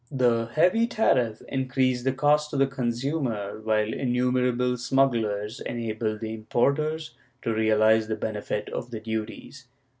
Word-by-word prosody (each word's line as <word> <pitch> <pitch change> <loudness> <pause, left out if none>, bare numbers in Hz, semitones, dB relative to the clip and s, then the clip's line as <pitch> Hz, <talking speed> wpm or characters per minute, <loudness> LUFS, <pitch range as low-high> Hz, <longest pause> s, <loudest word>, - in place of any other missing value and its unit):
The 120 -4 +2
heavy 185 +9 +3
tariff 125 - +1
increased 130 -1 0
the 130 - +3
cost 150 +3 +2
to 145 - -3
the 135 - +4
consumer, 120 -4 -2
while 110 0 +1
innumerable 125 0 +1
smugglei"s 115 -4 0
enabled 110 -2 -3
the 110 0 -4
importers 150 +8 0 0.3
to 115 - 0
realize 110 0 +3
the 110 - -1
benefit 105 -1 -3
of - - -5
the 115 -2 -5
duties. 110 +4 -6
120 Hz, 130 wpm, -26 LUFS, 110-135 Hz, 0.3 s, the